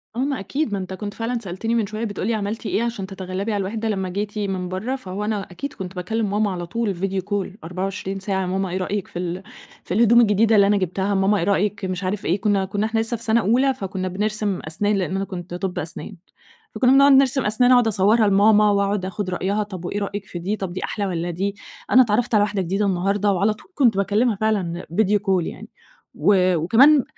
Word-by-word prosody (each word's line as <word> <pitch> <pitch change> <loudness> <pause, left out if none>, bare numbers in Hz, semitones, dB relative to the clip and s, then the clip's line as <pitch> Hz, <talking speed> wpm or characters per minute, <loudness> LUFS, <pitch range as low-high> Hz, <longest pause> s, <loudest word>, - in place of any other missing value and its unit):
آه - - -3
ما 275 -1 -1
أكيد، 265 +6 -2
ما - - 0
أنت 185 0 -6
كُنت 205 +1 -6
فعلًا 230 +1 -2
سَألتَني 210 +3 -3
من 225 -3 +1
شوية 215 +2 -5
بتقول 205 -1 -4
ليِ 230 - +1
"عَمَلتِ 215 +1 -3
إيه 215 - 0
عشان 235 -5 -3
تتغَلَّبي 190 +2 -4
على 205 - 0
الوَحدة 220 +3 -3
لمّا 190 -3 -2
جيتِ 205 +3 -4
من 190 -3 -2
برّا." 215 +9 -3
فَهو 200 -4 -5
أنا 210 -1 -1
أكيد 275 +11 -6
كُنت 190 0 -7
باكلم 210 +4 -2
ماما 205 0 +1
على 175 -1 -4
طول 215 +2 -2
فيديو 195 +1 -2
كول 200 0 -3
24 190 +3 -4
ساعة، 190 -1 -2
ماما 190 +1 -1
إيه 185 - -2
رأيكِ 195 +1 -2
في - - -7
ال 180 +1 -4 0.4
في - - -5
الهدوم 235 +2 +5
الجديدة 220 +1 +3
اللي 200 -1 +6
أنا 205 0 +3
جبتها، 190 +2 -1
ماما 195 +2 +2
إيه 170 - -1
رأيكِ 200 +1 0
مش 185 0 -3
عارف 190 +2 -3
إيه، 185 +4 0
كُنّا 200 -2 +2
كُنّا 205 +2 -2
إحنا 225 0 0
لسه 225 +1 -1
في 230 - -8
سنة 225 +1 +3
أولى، 255 +6 +3
فَكُنّا 190 -3 -4
بنرسَم 210 0 -1
أسنان 205 +7 -1
لأن 190 0 -1
أنا 195 - -1
كُنت 175 -2 -7
طَبّ 180 +1 -3
أسنان. 160 +5 -4 0.6
فَكُنّا 255 -1 +3
بنقعُد 275 +1 +6
نرسَم 270 -1 +4
أسنان 245 +4 +3
أقعُد 245 -2 +5
أصورها 210 +2 +3
لماما 210 +1 +5
وأقعُد 200 -1 0
آخُد 185 0 -4
رأيها 195 +4 -1
طب 185 -4 -8
وإيه 205 - -2
رأيكِ 200 0 -4
في 175 - -7
دي 190 +5 -2
طب 185 -3 -5
دي 185 - -4
أحلى 205 - -2
والّا 175 -2 -2
دي، 195 +4 -2 0.4
أنا 255 - +8
اتعَرَّفت 225 0 +1
على 210 - +5
واحدة 205 -1 -1
جديدة 195 +4 0
النهارده 200 +2 +1
وعلى 200 +3 +2
طول 215 - -19
كُنت 240 -8 +3
باكلمها 210 +3 +2
فعلًا 195 -5 -1
فيديو 210 -1 +3
كول 190 -4 0
يعني - - -9 0.5
و 185 -3 +3
وكمان 245 - +5
200 Hz, 225 wpm, -22 LUFS, 190-220 Hz, 0.6 s, أنا